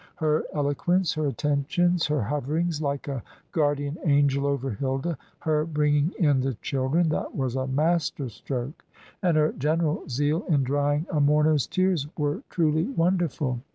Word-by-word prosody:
Her 155 -2 +1
eloquence, 155 +5 +1
her 155 -1 -1
attentions, 155 +5 +1
her 150 -5 0
hoverings 150 +6 -1
like 140 -1 -2
a 135 -4 -3 0.3
guardian 145 0 0
angel 140 -3 +3
over 135 -2 -1
Hilda, 135 - -2 0.3
her 155 -2 +1
bringing 150 0 +1
in 145 -6 +3
the 130 -1 -1
children 140 +8 0
that 155 - -2
was 130 -3 -1
a 130 0 -1
master 150 0 0
stroke 125 +4 -5 0.4
and 175 -5 +2
her 155 0 +3
general 155 +2 -1
zeal 145 - 0
in 145 -5 +3
drying 145 +3 +1
a 155 - +1
mourner's 150 0 +3
tears, 185 -6 +1
were 145 -1 -1
truly 160 -1 +1
wonderful. 170 - 0
150 Hz, 150 wpm, -26 LUFS, 140-160 Hz, 0.4 s, angel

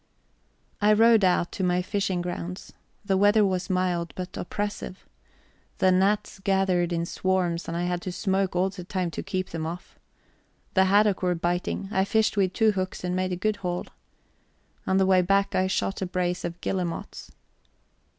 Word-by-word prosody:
I 210 +1 +5
rowed 225 0 +5
out 180 -1 +2
to 190 - -4
my 180 0 +1
fishing 190 -2 -1
grounds. 180 +1 -6 0.3
The 195 -2 +2
weather 205 +2 +5
was 185 -1 -1
mild, 180 -2 0
but 180 0 -6
oppressive. 205 0 -5 0.7
The 185 - +4
gnats 195 +2 +1
gathered 190 -3 +1
in 170 0 -1
swarms, 180 -1 -1
and 170 - -3
I 175 - -1
had 175 0 -1
to 185 - -4
smoke 190 0 -1
all 185 +2 +1
the 180 - -8
time 180 -2 -2
to - - -4
keep 185 0 -3
them 160 -1 -3
off. 175 +2 -8 0.7
The 190 -1 +4
haddock 205 0 +3
were 180 -1 +1
biting; 175 +3 -2
I 190 - +2
fished 220 +2 +1
with 190 -2 +1
two 220 -1 +3
hooks 185 -2 -4
and 180 0 -1
made 185 0 -1
a - - 0
good 210 +3 -1
haul. 180 -2 -3 1.0
On 190 - +2
the 190 - +4
way 185 -1 +5
back 195 +2 +1
I 185 0 +2
shot 195 +1 -1
a 190 - -1
brace 180 0 -1
of 170 0 -5
guillemots. 180 -3 -4
185 Hz, 180 wpm, -26 LUFS, 180-195 Hz, 1.0 s, I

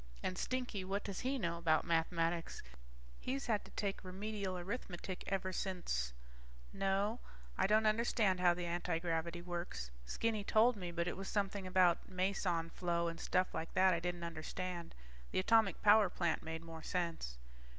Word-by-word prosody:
And 185 - -1
Stinky, 250 -4 -2
what 195 +2 -2
does 200 -3 -4
he 265 +2 0
know 170 -7 -1
about 160 -2 +3
mathematics? 165 0 0 0.6
He's 270 +2 -2
had 215 -4 +1
to - - -13
take 200 -1 -2
Remedial 195 0 -3
Arithmetic 185 -1 -5
ever 190 -1 -1
since... 175 - -1 0.6
No, 200 +4 +1 0.4
I 190 - +2
don't 215 +2 +4
understand 215 -3 +3
how 175 -1 +5
the 175 0 -3
antigravity 170 0 -1
works. 170 - -4 0.2
Skinny 220 - 0
told 225 +4 +5
me, 180 -4 -5
but 170 0 -1
it - - -2
was 195 0 -5
something 200 -2 -1
about 180 -2 +3
meson 180 -3 0
flow 170 -1 0
and 165 0 -7
stuff 185 0 +1
like 165 - -4
that 190 0 +6
that - - +4
I 170 - +1
didn't 175 0 -3
understand. 170 +1 -4 0.3
The - - -3
atomic 220 +1 +4
power 210 -1 +7
plant 170 -2 0
made 160 0 -5
more 165 -1 -8
sense. 165 - -2
185 Hz, 165 wpm, -37 LUFS, 170-200 Hz, 0.6 s, power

